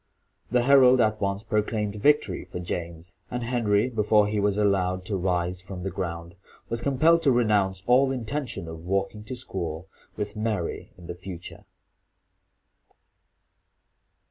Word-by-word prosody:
The 125 0 +2
herald 130 -1 +6
at 110 -2 +2
once 100 +1 -1
proclaimed 105 -1 -1
victory 150 +4 +2
for - - -7
James; 85 0 -5 0.2
and 125 -1 -3
Henry, 115 -3 +1
before 105 -3 +3
he 105 0 -1
was 100 0 +1
allowed 95 -3 +1
to 100 - -2
rise 90 -1 -1
from 90 -1 -8
the 95 - -3
ground, 85 -2 -5 0.4
was 115 0 -2
compelled 155 +6 +3
to 140 - +3
renounce 105 -6 +2
all 130 +2 +4
intention 125 - -4
of 80 0 -8
walking 100 +3 -2
to 130 - -5
school 90 -8 -5 0.3
with 105 +1 -4
Mary 105 -5 -3
in 90 - -13
the 85 - -5
future. 90 -1 -9
105 Hz, 145 wpm, -26 LUFS, 90-120 Hz, 0.4 s, herald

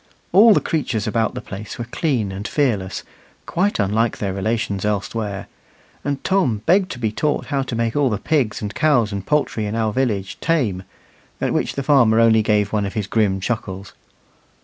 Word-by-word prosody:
All 210 +4 +7
the - - +4
creatures 125 - -2
about 115 -2 0
the - - -4
place 100 +1 -8
were 120 - -4
clean 120 - -1
and 100 +3 -5
fearless, 110 -11 -1 0.4
quite 195 +4 0
unlike 110 +3 +1
their 100 -2 -2
relations 100 0 -1
elsewhere; 105 -1 -2 0.6
and 140 -1 -3
Tom 145 - +1
begged 185 +1 +3
to - - -9
be 110 -3 -1
taught 150 +7 -1
how 140 - +2
to 130 -3 -4
make 115 0 -1
all 145 -3 +3
the 105 - -1
pigs 125 -5 0
and 105 0 -4
cows 120 -5 +2
and 100 -1 -4
poultry 145 -8 0
in 105 - -3
our 110 -2 0
village 105 -7 -1
tame, 125 - 0 0.6
at - - 0
which - - -1
the 140 - -2
farmer 125 -6 +4
only 115 -1 +5
gave 105 -1 +1
one 105 -2 +1
of 100 - -8
his 105 -3 -1
grim 100 -2 +1
chuckles. 95 -2 -4
110 Hz, 190 wpm, -21 LUFS, 105-135 Hz, 0.6 s, All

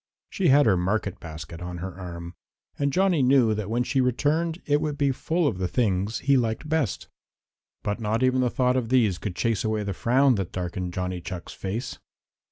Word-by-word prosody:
She 190 -4 +1
had 145 0 +6
her 105 - +4
market 100 +2 -1
basket 80 0 -8
on 90 0 -5
her 95 +1 -5
arm, 85 -1 -8 0.5
and 140 0 +1
Johnny 185 -2 +3
knew 125 -4 +4
that 105 -1 -4
when 120 +2 +1
she 135 +1 +1
returned 155 +7 +1
it 145 0 +2
would 150 -2 -2
be 140 -1 +2
full 165 +6 -1
of 105 -9 -2
the 90 - 0
things 105 -1 0
he 140 0 +5
liked 115 +3 -1
best. 155 - -1 0.8
But 105 +2 -2
not 110 +2 0
even 130 0 +3
the 125 - +2
thought 125 +1 +1
of 120 -3 -1
these 115 -8 +3
could 100 -4 -4
chase 115 -2 0
away 110 -1 0
the 100 -1 -3
frown 130 +7 +3
that 90 - -6
darkened 90 0 -4
Johnny 90 -1 -3
Chuck's 90 0 -7
face. 115 +6 -5
115 Hz, 200 wpm, -25 LUFS, 95-135 Hz, 0.8 s, had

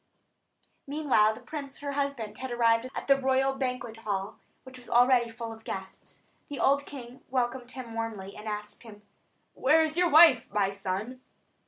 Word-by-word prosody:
Meanwhile 275 -7 +2
the 240 - -12
prince, 275 +1 -7
her 285 -1 -5
husband, 275 -7 -3
had 260 - -5
arrived 235 0 +2
at - - -4
the 275 -1 +5
royal 265 +1 +2
banquet 250 -4 -4
hall, 205 -3 -4 0.2
which 260 -1 -12
was 245 - -15
already 245 0 +4
full 230 0 -7
of 225 0 -15
guests. 190 -2 -8 0.3
The 285 - -6
old 280 +1 +2
king 255 -2 -10
welcomed 250 -1 -1
him 255 -3 -8
warmly, 220 -4 -5
and 210 +1 -9
asked 210 0 -6
him: 210 -3 -13 0.5
"Where 310 +5 +4
is 315 +1 -1
your 355 -1 +3
wife, 295 -6 +6
my 200 -1 +1
son?" 200 +6 -4
245 Hz, 170 wpm, -28 LUFS, 220-270 Hz, 0.5 s, wife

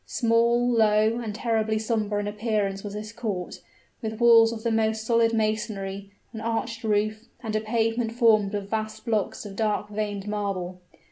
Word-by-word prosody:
Small, 235 +1 +2
low, 220 -1 +3
and 220 -3 -5
terribly 220 -1 0
somber 215 -2 -1
in 205 - -3
appearance 205 -2 -1
was 205 -1 -6
this 215 0 -6
court 210 -6 -4 0.4
with 220 -1 -4
walls 230 -1 +7
of 225 -1 -6
the 230 - +1
most 220 0 0
solid 230 0 +3
masonry, 215 -3 -2 0.2
an 220 - -6
arched 230 +1 -2
roof, 215 +1 0 0.2
and 215 -2 -3
a 215 - +1
pavement 225 +1 0
formed 215 -4 +3
of 200 -1 -4
vast 220 +1 -4
blocks 220 -2 -1
of 200 -1 -8
dark 210 -1 -1
veined 205 -1 -3
marble. 195 -3 -3
220 Hz, 165 wpm, -26 LUFS, 210-230 Hz, 0.4 s, walls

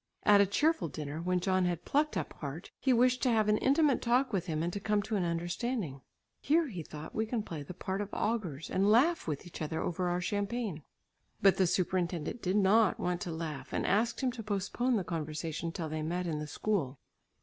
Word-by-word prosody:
At 205 -1 +7
a 200 - +4
cheerful 295 - +2
dinner, 150 +1 -5
when 180 +1 +1
John 185 0 +1
had 175 -1 -2
plucked 300 +2 +1
up - - -3
heart, 150 +4 -6
he 265 - +2
wished 250 +1 +4
to 255 - +3
have 220 -3 +3
an 210 0 +3
intimate 280 0 +3
talk 245 +1 +2
with 185 -2 -1
him 160 -1 -1
and 175 +1 -2
to 200 - -2
come 210 0 +1
to 215 +1 -2
an 195 - +1
understanding. 170 - -2 0.4
"Here," 315 +1 +2
he 180 -7 -5
thought, 155 0 -9
"we 220 0 -1
can 225 -1 -1
play 165 -7 -6
the 155 +5 -8
part 190 +2 -3
of 205 - -4
augurs 185 -10 -2
and 195 +2 +3
laugh 285 +10 +4
with 150 -3 -3
each 175 - -9
other 160 +1 -2
over 180 +1 -1
our 175 0 0
champagne." 205 -1 -2 0.6
But 195 -1 +5
the 190 - +4
superintendent 180 +3 -1
did 185 +2 0
not 205 +1 +4
want 180 0 -1
to 175 - -3
laugh 160 -3 -5
and - - 0
asked 230 +6 +1
him 260 -2 +1
to 240 -2 -7
postpone 215 +4 0
the 200 - 0
conversation 160 0 -3
till 165 -1 -4
they 155 0 -3
met 175 +3 -2
in 155 -3 -2
the 150 - -5
school. 150 -5 -1
185 Hz, 220 wpm, -31 LUFS, 165-225 Hz, 0.6 s, At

